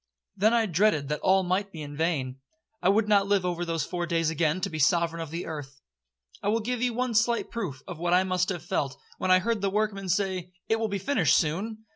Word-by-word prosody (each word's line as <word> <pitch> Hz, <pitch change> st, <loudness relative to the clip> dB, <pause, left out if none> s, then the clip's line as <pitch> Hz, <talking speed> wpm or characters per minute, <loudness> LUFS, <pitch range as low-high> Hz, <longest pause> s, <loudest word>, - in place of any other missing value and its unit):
Then 205 Hz, +3 st, +3 dB
I 230 Hz, -1 st, +3 dB
dreaded 170 Hz, -6 st, +2 dB
that 150 Hz, -, -1 dB
all 190 Hz, 0 st, +3 dB
might 190 Hz, +2 st, -1 dB
be 160 Hz, -4 st, -7 dB
in 145 Hz, 0 st, -8 dB
vain. 140 Hz, -5 st, -1 dB, 0.4 s
I 180 Hz, -, +3 dB
would 210 Hz, +2 st, +3 dB
not 200 Hz, -2 st, +4 dB
live 200 Hz, -2 st, +2 dB
over 175 Hz, -1 st, -1 dB
those 165 Hz, -3 st, -1 dB
four 175 Hz, -1 st, -3 dB
days 165 Hz, -2 st, +1 dB
again 160 Hz, +1 st, +1 dB
to -, -, -1 dB
be 155 Hz, -, -4 dB
sovereign 170 Hz, +2 st, +2 dB
of 165 Hz, -, -5 dB
the 170 Hz, +3 st, -5 dB
earth. 145 Hz, -4 st, -7 dB, 0.6 s
I -, -, -3 dB
will 220 Hz, +2 st, +2 dB
give 240 Hz, +2 st, -3 dB
you 250 Hz, -1 st, +2 dB
one 250 Hz, 0 st, -1 dB
slight 230 Hz, +2 st, +1 dB
proof 175 Hz, -, -5 dB
of 175 Hz, -4 st, -7 dB
what 175 Hz, +1 st, +2 dB
I 185 Hz, -, +4 dB
must 185 Hz, 0 st, 0 dB
have 175 Hz, -4 st, -3 dB
felt, 140 Hz, -5 st, -2 dB, 0.2 s
when 185 Hz, -, -1 dB
I 185 Hz, -, +7 dB
heard 220 Hz, +2 st, -1 dB
the 200 Hz, -, +1 dB
workmen 200 Hz, -1 st, -1 dB
say, 185 Hz, -1 st, -1 dB
'It 225 Hz, -, +1 dB
will 225 Hz, -, 0 dB
be 200 Hz, -1 st, -2 dB
finished 195 Hz, -, +2 dB
soon.' 215 Hz, +8 st, -2 dB
185 Hz, 240 wpm, -27 LUFS, 165-210 Hz, 0.6 s, I